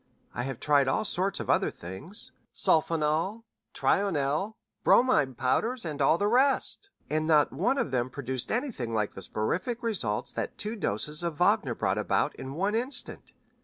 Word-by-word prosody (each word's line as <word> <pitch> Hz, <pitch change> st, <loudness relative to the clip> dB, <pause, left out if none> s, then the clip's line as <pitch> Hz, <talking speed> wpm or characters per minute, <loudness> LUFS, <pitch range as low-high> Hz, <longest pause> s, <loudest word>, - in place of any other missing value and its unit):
I 120 Hz, -, -3 dB
have 135 Hz, -3 st, -5 dB
tried 145 Hz, -2 st, +3 dB
all 130 Hz, -, +1 dB
sorts 195 Hz, -1 st, 0 dB
of -, -, -5 dB
other -, -, +2 dB
things 115 Hz, -, -5 dB, 0.2 s
sulfonal, 160 Hz, +6 st, +1 dB, 0.3 s
trionel, 190 Hz, +1 st, 0 dB, 0.3 s
bromide 145 Hz, -, +4 dB
powders, 225 Hz, -, 0 dB
and 150 Hz, -3 st, -4 dB
all 140 Hz, +4 st, +4 dB
the 205 Hz, -, 0 dB
rest, 270 Hz, -, +2 dB, 0.2 s
and 155 Hz, +1 st, -1 dB
not 150 Hz, -2 st, +4 dB
one 210 Hz, -, +1 dB
of 150 Hz, -, -1 dB
them 125 Hz, -1 st, 0 dB
produced 130 Hz, -1 st, -1 dB
anything 220 Hz, -, -2 dB
like 105 Hz, -2 st, -1 dB
the -, -, -9 dB
soporific 185 Hz, -, -2 dB
results 160 Hz, -, -1 dB
that -, -, -4 dB
two 215 Hz, +2 st, -3 dB
doses 150 Hz, -, -2 dB
of 170 Hz, -2 st, -2 dB
Wagner -, -, +2 dB
brought -, -, 0 dB
about -, -, +1 dB
in 135 Hz, +1 st, -7 dB
one 195 Hz, +5 st, 0 dB
instant. 250 Hz, +4 st, 0 dB
155 Hz, 165 wpm, -28 LUFS, 130-215 Hz, 0.3 s, bromide